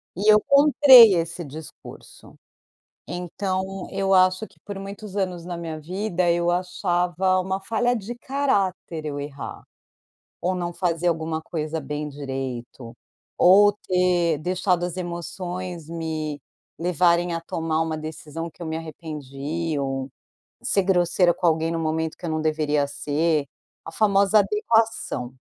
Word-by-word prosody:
E 205 +4 +4
eu 210 - +7
comprei 280 -6 +8
esse 170 +1 -2
discurso, 155 +1 -12 0.7
então 190 +2 -4
eu 195 0 0
acho 185 +2 +4
que - - -27
por 200 -1 -7
muitos 200 +1 -8
anos 180 -3 -2
na 175 0 -5
minha 165 -2 -5
vida 180 +2 -1
eu 170 0 +1
achava 180 0 0
uma 190 +1 -2
falha 230 +5 0
de 225 +1 -5
caráter 200 - -1
eu 145 -1 -4
errar, 140 -1 -7 0.8
ou 185 +1 0
não 175 -1 -3
fazer 175 -1 -1
alguma 160 -1 0
coisa 160 -1 -4
bem 150 0 -4
direito. 130 -4 -6 0.5
Ou 205 +3 +7
ter 180 -3 +2
deixado 180 +2 0
as 175 0 -4
emoções 175 -1 -5
me 160 -3 -4 0.4
levarem 175 +1 +2
a 165 - -2
tomar 165 -1 -2
uma 160 -1 -1
decisão 155 +1 -6
que - - -30
eu 170 - -5
me 160 0 -3
arrependi, 155 0 -5
ou 135 -1 -2 0.6
ser 225 -6 +2
grosseira 175 -1 +3
com 180 - -4
alguém 160 0 +2
no 165 - -2
momento 160 0 -1
que - - -8
eu - - -2
não 155 0 -1
deveria 150 -2 +1
ser, 150 +2 0 0.4
a 165 - -8
famosa 200 +2 +4
"adequação". 210 - 0
175 Hz, 140 wpm, -24 LUFS, 155-190 Hz, 0.8 s, comprei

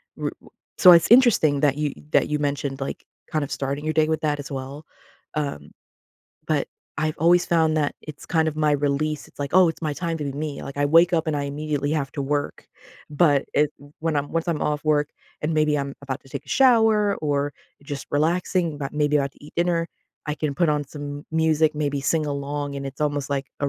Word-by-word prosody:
w - - -2
w - - -17 0.3
so, 185 -4 +9
it's 170 +1 +6
interesting 225 - +5
that 145 -2 +3
you 150 -1 0 0.2
that - - +3
you 150 - +1
mentioned, 140 -1 -2
like, 135 - -5 0.3
kind 155 -2 0
of 140 - -6
starting 140 +2 -3
your 155 - 0
day 155 -1 +4
with 160 0 -1
that 150 -1 0
as 145 - -7
well, 135 +3 -6 0.5
um, 140 - -3 0.8
but - - +1 0.3
I've 155 -1 -1
always 175 +2 +4
found 160 -2 +2
that 145 -2 0
it's 150 -2 -10
kind 160 -1 +2
of 155 - -5
my 150 -1 +2
release, 145 +1 -1
it's - - -25
like, 140 -1 -4
"Oh, 185 -2 +7
it's 165 - -5
my 155 -2 -1
time 165 +2 -3
to 150 - -3
be 140 - -3
me." 145 0 -5
Like, 140 - -8
I 145 - +2
wake 165 +4 +5
up 165 0 +1
and 150 - 0
I 145 - -1
immediately 145 0 -2
have 140 -3 -1
to 140 - -3
work, 145 +1 -2 0.4
but 145 -2 +3
it 150 0 +3 0.3
when 160 -1 0
I'm 145 0 -2
once 165 +1 -1
I'm 160 -3 0
off 150 0 -1
work 150 -1 +2 0.3
and 155 +1 0
maybe 155 -1 +2
I'm 140 0 -4
about 135 -1 -4
to 135 - -18
take - - -6
a - - -18
shower 225 -5 +4
or 145 -1 -1 0.3
just 140 -1 -6
relaxing, 165 +1 0
but 140 -1 -4
maybe 150 0 +2
about 140 -1 0
to - - -18
eat 150 - -13
dinner, 170 -1 +1 0.4
I 150 - -1
can 150 -1 -2
put 170 +1 +2
on 150 0 +1
some 145 0 -7
m - - -17
music, 160 -1 +2
maybe 145 -2 -1
sing 155 +3 0
along, 145 0 -3
and 140 - -5
it's 135 +2 -9
almost 145 -2 -1
like 140 -1 -1
a 145 - +1
150 Hz, 230 wpm, -23 LUFS, 145-160 Hz, 0.8 s, so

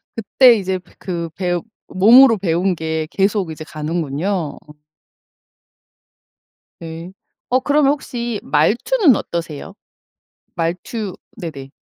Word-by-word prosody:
그때 235 +3 +5
이제 190 -1 -2 0.2
그 170 -3 -4
배우 175 -2 -2 0.2
몸으로 230 +5 +6
배운 180 0 0
게 160 -1 -3
계속 195 -3 0
이제 155 0 -8
가는군요. 160 +2 -3 2.2
네. 165 +2 -8 0.4
어 255 +1 +2
그러면 285 +1 +3
혹시 240 -6 -4
말투는 245 - +3
어떠세요? 170 +1 -5 0.8
말투 180 +5 -3 0.2
네네. 150 -8 -7
185 Hz, 200 characters per minute, -19 LUFS, 165-225 Hz, 2.2 s, 몸으로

